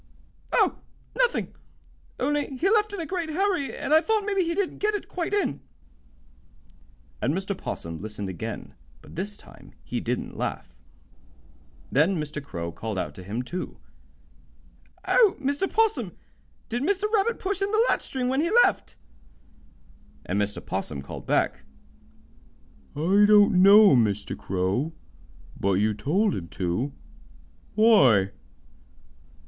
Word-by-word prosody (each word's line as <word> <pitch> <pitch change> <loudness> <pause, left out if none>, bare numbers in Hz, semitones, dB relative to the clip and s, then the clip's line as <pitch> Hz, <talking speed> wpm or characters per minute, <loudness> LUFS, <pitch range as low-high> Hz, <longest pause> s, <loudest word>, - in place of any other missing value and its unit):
"Oh, - - +2 0.4
nothing, - - 0 0.7
only 290 0 -1
he 385 +8 +1
left 430 -1 +3
in 405 - -5
a 330 - -3
great 345 -2 -3
hurry, 360 -3 -1
and 300 - -1
I 315 - +7
thought 435 +1 0
maybe 395 -2 +1
he 335 0 -2
didn't 395 -2 -2
get 420 +1 +1
it 410 - -5
quite 350 -1 -3
in." 400 - 0 1.6
And 140 +5 +1
Mr. 195 +1 -3
'Possum 85 - -6
listened 105 -1 -5
again, 90 -3 -6 0.3
but - - -14
this 205 +4 -4
time - - -16
he - - -3
didn't - - -3
laugh. - - -4 1.2
Then 160 +7 +3
Mr. 150 -1 -5
Crow 85 -11 -5
called 110 +3 -5
out - - -3
to - - -11
him, 110 +7 -4
too: 180 +8 -6 1.3
"Oh, 435 -6 +4
Mr. 285 +7 -1
'Possum, 445 0 +1 0.5
did 240 +1 -3
Mr. 385 +6 0
Rabbit 445 +2 +2
push 390 0 -3
in 395 - +1
the 440 +2 +3
latch - - +1
string 255 -2 -3
when 265 +3 +1
he 335 - 0
left?" - - -1 1.3
And 100 +3 0
Mr. 105 0 -3
'Possum 75 -7 -4
called - - -9
back: - - +1 1.4
"I 190 +8 +4
don't 205 -3 +6
know, 200 -3 +8
Mr. 105 -4 +1
Crow. 95 - -1 0.7
But 100 0 +1
you 105 +3 +2
told 180 - +1
him 85 - -5
to. 90 +11 -2 0.8
Why?" 135 - +5
205 Hz, 140 wpm, -26 LUFS, -, 1.6 s, know